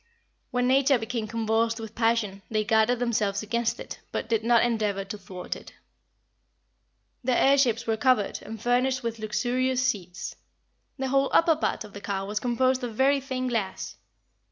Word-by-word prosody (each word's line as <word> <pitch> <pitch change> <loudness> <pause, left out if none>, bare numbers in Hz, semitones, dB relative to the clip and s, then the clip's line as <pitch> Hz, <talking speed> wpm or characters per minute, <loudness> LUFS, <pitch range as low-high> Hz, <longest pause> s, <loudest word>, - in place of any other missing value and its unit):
When 245 0 0
nature 270 +1 +4
became 225 -1 -3
convulsed 225 +1 0
with 220 -1 -7
passion, 225 -4 0
they 215 -1 +1
guarded 220 +3 +3
themselves 215 -4 0
against 235 +2 -1
it, - - -8
but - - -3
did 225 -2 +1
not 235 0 +4
endeavor 210 -4 0
to 200 - -6
thwart 185 -3 -6
it. - - -12 1.5
Their 250 0 +2
air 275 +1 +5
ships 240 -4 +2
were 225 -1 0
covered, 250 -5 +2
and 225 +1 -8
furnished 250 +3 +1
with 230 -1 -3
luxurious 250 +4 0
seats. 180 -8 -3 0.6
The 265 -1 -2
whole 275 +1 +2
upper 330 -1 +5
part 310 - -1
of 210 -2 -12
the 200 - -8
car 195 -1 -3
was 210 +1 -2
composed 255 +2 +1
of 235 -3 -4
very 275 +3 +4
thin 260 -1 -3
glass. 220 -6 -3
230 Hz, 170 wpm, -27 LUFS, 215-255 Hz, 1.5 s, air